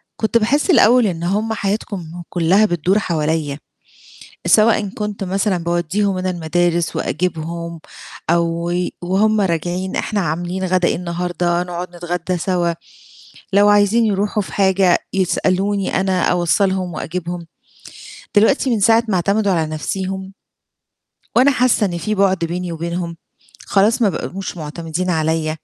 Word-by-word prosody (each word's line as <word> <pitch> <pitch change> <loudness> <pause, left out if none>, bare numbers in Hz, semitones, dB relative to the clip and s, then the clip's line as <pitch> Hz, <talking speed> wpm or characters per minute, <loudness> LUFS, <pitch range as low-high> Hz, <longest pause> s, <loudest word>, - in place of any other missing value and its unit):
كنت 220 +1 +1
باحِسّ 265 - +1
الأول 245 - +5
إن 170 -3 -3
هم 210 +5 0
حياتهم 195 -5 -4
كُلّها 180 +5 +3
بتدور 180 +2 +1
حواليّا، 155 -4 -1 0.9
سواءً 215 -1 +4
كنت 210 0 -4
مثلًا 190 0 0
باودّيهم 185 +3 0
أنا 185 0 -1
المدارس 175 0 0
وأجيبهم، 170 0 -3 0.5
أو 170 0 0
و 180 0 0
وهُم 210 +4 +2
راجعين 180 +1 -1
إحنا 210 -2 -1
عاملين 175 +3 -2
غدا 185 -1 +2
إيه - - 0
النهارده، 175 0 -1
نقعد 180 0 -6
نتغدى 175 +1 -3
سوا، 175 -1 0 0.8
لو 205 +1 +5
عايزين 205 +3 +4
يروحوا 205 +1 0
في - - -10
حاجة 190 -2 +3
يسألوني 190 +1 0
أنا 190 -2 0
أوصّلهم 180 +1 +1
وأجيبهم، 175 +1 -5 0.9
دلوقتي 240 +6 +4
من 230 -4 +1
ساعة 225 +3 +4
ما 200 - 0
اعتمدوا 200 +3 +1
على 160 -3 +1
نفسيهم 190 +5 -4 1.0
وأنا 260 +4 +5
حاسة 250 -4 +2
إن 175 -3 -2
في 215 +6 -2
بُعد 195 -1 +3
بيني 175 +1 -4
وبينهم، 170 +1 -4 0.5
خلاص 215 +5 +2
ما 210 - +4
بقوش 190 0 -5
مُعتمدين 165 +3 -4
عليّا. 160 -1 0
185 Hz, 130 wpm, -19 LUFS, 170-200 Hz, 1.0 s, الأول